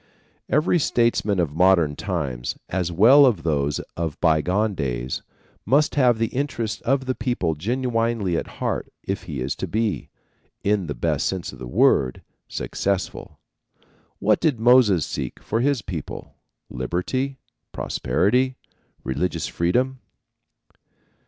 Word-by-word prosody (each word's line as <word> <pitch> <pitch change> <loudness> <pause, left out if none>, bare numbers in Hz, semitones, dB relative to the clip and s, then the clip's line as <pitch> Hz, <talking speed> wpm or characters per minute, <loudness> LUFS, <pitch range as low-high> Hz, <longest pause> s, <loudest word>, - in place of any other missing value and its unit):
Every 155 +5 +3
statesman 115 - +1
of 80 -5 0
modern 85 -3 +4
times, 70 -12 -3
as 90 -1 -1
well 125 - +7
as 105 -10 0
those 75 -3 0 0.2
of 80 -3 -3
bygone 90 +6 +2
days, 65 -6 -3 0.4
must 150 +3 +3
have 125 -5 +4
the 115 0 0
interests 120 -5 -2
of 135 +1 +1
the 130 - 0
people 120 -9 -1
genuinely 115 - -1
at - - -2
heart - - -2
if 95 0 -4
he 70 -6 -5
is 70 +6 -2
to 95 - -3
be, 110 +3 -1 0.5
in 100 -3 +1
the 70 - -4
best - - 0
sense 95 -6 -3
of 65 - -12
the 65 - -7
word, 65 0 +2 0.2
successful. 100 -1 -3 0.8
What 105 +1 +2
did 150 -8 +1
Moses 115 -8 +5
seek - - -5
for 110 - -2
his 140 -3 +1
people? 85 -6 -6 0.4
Liberty? 130 - -2 0.3
Prosperity? 125 +6 +1 0.5
Religious 75 +7 -1
freedom? 125 +10 0
100 Hz, 130 wpm, -23 LUFS, 80-125 Hz, 0.8 s, well